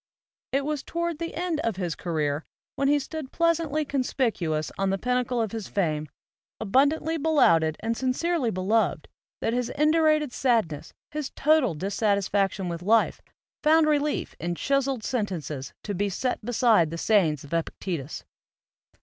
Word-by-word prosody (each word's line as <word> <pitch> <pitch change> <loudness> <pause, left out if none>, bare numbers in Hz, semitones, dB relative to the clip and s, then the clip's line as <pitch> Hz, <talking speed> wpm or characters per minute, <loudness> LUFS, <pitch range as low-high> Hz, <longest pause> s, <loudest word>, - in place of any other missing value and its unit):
It 275 +1 0
was 300 -2 -2
toward 340 0 -3
the 335 0 -4
end 345 -2 -1
of 230 -9 -1
his 175 -3 -2
career, 155 -3 -2 0.3
when 275 - +1
he 290 +1 +4
stood 290 0 -6
pleasantly 330 -3 +1
conspicuous 225 - -1
on 195 0 0
the 195 - +1
pinnacle 250 +2 0
of 220 -3 -1
his 220 -4 -5
fame, 155 -6 -1 0.5
abundantly 285 +9 +2
belauded 170 - +3
and 230 +1 -1
sincerely 265 +3 0
be 185 -3 -3
loved, 220 +4 +1 0.3
that 225 - 0
his 245 -1 -1
indurated 305 -2 +3
sadness, 220 - 0 0.2
his 300 -2 -3
total 295 - +3
dis 195 +6 -3
satisfaction 200 -2 +1
with 170 -1 -4
life, 220 +5 +2 0.4
found 315 +1 +5
relief 300 -1 0
in 175 +1 -2
chiseled 275 0 0
sentences 165 - -3
to 205 - -3
be 200 +2 0
set 245 +5 -2
beside 220 -7 +3
the 165 - -5
sayings 165 -7 +2
of 145 - -10
Epic 165 -1 -1
tetus. 160 -6 -4
230 Hz, 155 wpm, -26 LUFS, 180-290 Hz, 0.5 s, found